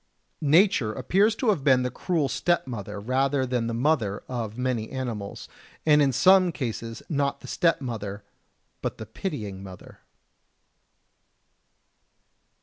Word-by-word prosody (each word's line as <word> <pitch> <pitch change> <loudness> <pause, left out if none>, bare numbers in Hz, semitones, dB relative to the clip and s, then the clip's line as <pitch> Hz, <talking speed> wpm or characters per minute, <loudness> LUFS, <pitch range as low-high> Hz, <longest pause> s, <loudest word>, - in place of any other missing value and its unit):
Nature 155 - +4
appears 205 - +2
to 240 0 0
have 180 -10 +1
been 130 -3 +4
the 125 - -2
cruel 160 +2 0
stepmother 115 - -1
rather 130 +4 +1
than 125 -2 -1
the - - -2
mother 115 -5 0
of 115 -3 -4
many 125 -4 -1
animals, 120 -7 -5 0.4
and 150 -1 +5
in 140 -2 +4
some 185 +6 +5
cases 115 -5 -5
not 140 -2 -1
the - - -10
stepmother, 115 - -1 0.6
but - - -3
the 110 - -7
pitying 110 - -5
mother. 95 -2 -12
130 Hz, 125 wpm, -26 LUFS, 110-150 Hz, 0.6 s, and